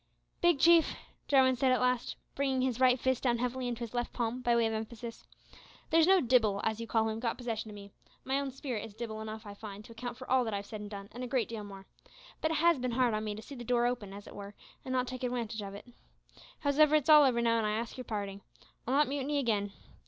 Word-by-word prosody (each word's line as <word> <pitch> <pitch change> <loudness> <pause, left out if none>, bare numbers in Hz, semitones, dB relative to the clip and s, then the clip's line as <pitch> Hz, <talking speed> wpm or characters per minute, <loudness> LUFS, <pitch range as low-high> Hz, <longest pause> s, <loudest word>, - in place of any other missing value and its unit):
"Big 345 -4 +4
Chief," 335 0 +6
said - - -6 0.3
Jarwin 265 -2 +5
at 255 -1 +4
last, 250 -1 0 0.2
bringing 270 -2 0
his 255 -2 -1
right 255 -1 +5
fist 260 0 0
down 240 -2 +2
heavily 250 +1 -2
into 240 -1 -4
his 235 -1 -5
left 240 -1 -2
palm, 240 +1 -2
by 240 -1 +2
way 235 -1 +3
of 225 - 0
emphasis, 230 +1 -6 0.6
"there's 325 0 +5
no 380 0 +6
dibbil, 230 - +3
as 220 0 -1
you 230 - -5
call 225 -1 +2
him, 220 0 -3
got 230 -1 -2
possession 225 -3 -4
o' - - -9
me. 200 0 -11 0.3
My 270 +1 0
own 280 -1 -2
spirit 260 -4 -4
is 205 - -10
dibbil 220 -1 -5
enough, 220 0 -7
I 205 - -7
find, 205 0 -9
to - - -13
account 240 +1 -6
for 255 - -9
all 260 0 +3
that 220 -2 -2
I've 200 0 -4
said 215 0 -7
and 205 - -7
done 200 -1 -7
an' 245 - -8
a 250 - -3
great 250 -2 0
deal 225 -2 -5
more. 195 -1 -10 0.6
But 315 - +1
it 320 - 0
has 335 -2 +4
bin 250 -1 -2
hard 245 -2 +2
on 215 0 -1
me 210 -1 -3
to 215 - -9
see 280 - -10
the 245 -3 -7
door 240 0 +2
open, 240 -5 -2
as 200 +1 -9
it - - -11
were, 200 0 -9 0.3
an' 260 - -6
not 255 -1 +1
take 255 0 -6
adwantage 235 -3 -2
of 200 -1 -7
it. 200 - -10 0.8
Howsever, 305 +1 +4
it's 300 -3 +2
all 305 -1 +9
over 255 -4 +3
now, 230 -1 +2
an' 220 - 0
I 210 - 0
ax 230 +1 -4
yer 255 - -6
parding. 200 -3 -4 0.5
I'll 260 - +1
not 295 +1 +4
mutiny 285 +1 -1
again. 210 -7 0
240 Hz, 265 wpm, -31 LUFS, 220-260 Hz, 0.8 s, all